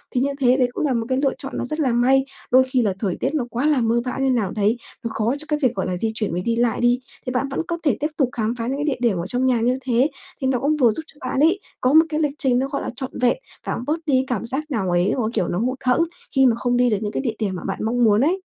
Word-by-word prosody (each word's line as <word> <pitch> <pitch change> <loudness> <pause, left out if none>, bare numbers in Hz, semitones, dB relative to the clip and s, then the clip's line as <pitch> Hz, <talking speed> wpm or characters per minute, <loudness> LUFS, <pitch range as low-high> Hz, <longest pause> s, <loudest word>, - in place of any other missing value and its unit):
Thì 250 - +2
như 275 - +1
thế 255 -1 +4
đấy 255 -2 +3
cũng - - -1
là 275 - +1
một 230 -2 -1
cái 260 - +1
lựa 275 -2 +2
chọn 270 - -7
nó - - -2
rất 305 +5 -3
là 270 -5 +2
may, 265 +3 +3 0.3
đôi 255 +1 +7
khi 260 -1 0
là 205 -4 +1
thời 195 -5 -1
tiết 265 - 0
nó 290 -6 0
quá 245 +4 -1
là 300 -4 +3
mưa 230 +1 +2
bão 250 - -3
như 270 0 +2
nào 220 -7 0
đấy, 215 +2 +1 0.3
nó 230 - -2
khó 225 +3 0
cho 310 - -7
cái 300 -1 0
việc, 255 -4 +2
gọi 190 - -2
là, 180 - -2
di 220 +4 -1
chuyển 220 -2 -2
với 175 +2 -2
đi 230 +5 0
lại 235 0 +1
đi, 240 +1 +3 0.3
thì 250 - -2
bạn 250 +2 0
vẫn 275 - -2
có 340 - -2
thể 295 - +2
tiếp 300 - 0
tục 270 -5 +2
khám 230 -3 -1
phá 230 0 -3
những 270 +2 -1
cái 290 - -2
địa 285 -5 -1
điểm 195 - -1
ở 170 - -3
trong 250 +5 0
nhà 250 -2 +3
như 245 +2 +2
thế, 255 +1 +2 0.3
thì 265 - +1
nó 260 -2 +1
cũng 300 +4 +1
vừa 250 -5 +5
giúp 315 - -4
cho 305 - -19
bạn 255 +1 -2
ấy 330 +7 +4 0.2
có 255 +2 +2
một 320 +1 +7
cái 305 0 -1
lịch 295 -2 0
trình 255 -4 +2
nó, 265 - 0
gọi 280 0 -3
là, - - -3
trọn 260 0 -5
vẹn 250 - +3 0.3
và - - 0
cũng - - -5
bớt 305 +2 +1
đi 295 - 0
cái 260 0 +4
cảm 235 -3 -2
giác 295 +6 -4
nào 205 -8 -1
ấy, 175 +2 +2
mà 255 - -1
cái 220 - 0
kiểu 180 - 0
nó 175 - -1
hụt 255 +3 -1
hẫng 250 +5 +3 0.3
khi 270 0 +5
mà 240 -3 +4
không 245 +1 0
đi 245 0 +4
được 210 - +1
những 210 -1 -2
cái - - -2
địa 235 -5 -2
điểm 200 -4 -1
mà 180 - -6
bạn - - -3
mong 240 +2 +1
muốn 215 -1 +4
ấy. 355 +7 +1
250 Hz, 340 wpm, -22 LUFS, 230-275 Hz, 0.3 s, đôi